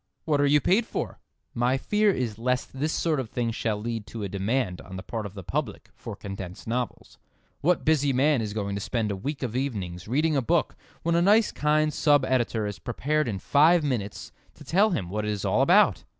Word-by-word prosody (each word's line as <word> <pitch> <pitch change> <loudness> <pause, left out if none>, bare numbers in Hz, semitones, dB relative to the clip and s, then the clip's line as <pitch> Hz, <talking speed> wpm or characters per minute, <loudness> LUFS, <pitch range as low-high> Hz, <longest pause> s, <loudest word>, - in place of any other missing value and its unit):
What 145 -3 +2
are 145 - +4
you 150 +1 +5
paid 205 - +2
for?" - - -4 0.3
My 125 +3 +1
fear 210 +9 +2
is 120 - -1
lest 125 +2 -1
this 145 +4 -1
sort 160 -4 0
of 125 -4 -4
thing 120 -1 -1
shall 110 -1 -1
lead 115 -1 -4
to 115 -1 -6
a - - -2
demand 100 0 -1
on 95 - -10
the 95 - -7
part 110 -1 -4
of 100 - -14
the 100 - -7
public - - -4
for - - -8
condensed 95 -2 -8
novels. 120 +1 -4 0.4
What 170 +3 +1
busy 145 -3 +3
man 135 0 +3
is 105 -1 -4
going 100 -2 -2
to 100 - -3
spend 110 -1 -1
a - - -2
week 135 +9 -4
of 120 -2 -3
evenings 100 -10 -3
reading 150 +6 +1
a 135 - +2
book 115 - +1 0.3
when 170 - +1
a 170 - +3
nice 210 +4 +4
kind 150 0 +1
sub 145 -4 +3
editor 120 -4 0
is 105 -1 -5
prepared 150 +4 -1
in 105 -4 -2
five 155 - +4
minutes 115 -8 -3 0.2
to - - -13
tell 200 +6 +3
him 110 - -2
what 105 +1 -2
it 105 - -2
is 105 -2 -3
all - - +2
about! - - +4
125 Hz, 220 wpm, -26 LUFS, 105-150 Hz, 0.4 s, you